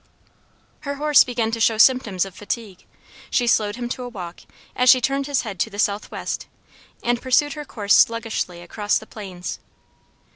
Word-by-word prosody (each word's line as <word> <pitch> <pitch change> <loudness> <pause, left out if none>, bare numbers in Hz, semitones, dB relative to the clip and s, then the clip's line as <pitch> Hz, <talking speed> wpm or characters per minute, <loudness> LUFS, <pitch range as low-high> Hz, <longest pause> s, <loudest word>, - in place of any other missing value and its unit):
Her 285 -1 -5
horse 295 0 +5
began 235 -3 -2
to 230 - -3
show 225 0 +3
symptoms 220 -6 +4
of 195 - -10
fatigue. 205 -2 -6 0.4
She 245 - +1
slowed 215 -3 +2
him 240 0 -4
to 255 - -4
a 245 - -5
walk 180 -6 -8 0.4
as 250 0 +3
she 255 - +8
turned 275 +2 -1
his 285 -3 0
head 200 -6 -7
to 225 - 0
the 205 - -10
southwest, 205 0 -2 0.6
and 240 0 0
pursued 280 +3 +2
her 300 0 -7
course 205 -6 0
sluggishly 225 -6 +1
across 205 +4 0
the 220 - -8
plains. 190 -5 -7
230 Hz, 175 wpm, -22 LUFS, 205-255 Hz, 0.6 s, she